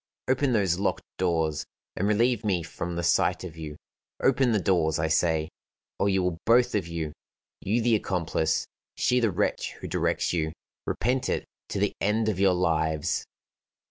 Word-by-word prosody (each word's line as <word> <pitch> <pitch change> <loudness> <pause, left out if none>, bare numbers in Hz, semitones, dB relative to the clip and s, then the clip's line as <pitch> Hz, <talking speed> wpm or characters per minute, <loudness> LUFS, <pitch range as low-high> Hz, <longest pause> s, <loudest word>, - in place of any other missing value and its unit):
Open 130 0 +2
those 95 -5 +2
locked 100 - 0 0.2
doors, 80 -4 +1 0.3
and 100 - 0
relieve 115 +2 +2
me 95 -5 +1
from 85 +2 -5
the 85 - -2
sight - - +2
of 85 -3 -7
you. 75 -2 -7 0.4
Open 135 -2 +3
the 110 - +3
doors, 85 -5 +2
I 80 - 0
say, 80 -1 +2 0.5
or 100 - +2
you 95 -1 +2
will 90 -2 -1
both 120 +2 +5
of 100 -5 0
you 80 -3 -4 0.5
you 110 +4 0
the 120 0 +3
accomplice, 85 -6 0 0.3
she 125 - +2
the 115 -2 +2
wretch 90 - -1
who - - -8
directs - - 0
you 80 -2 -1 0.3
repent 125 +3 0
it - - -1 0.2
to - - -3
the - - +1
end 110 +2 +2
of 100 -4 -2
your 95 -2 +4
lives." 80 -3 0
90 Hz, 175 wpm, -27 LUFS, 80-110 Hz, 0.5 s, both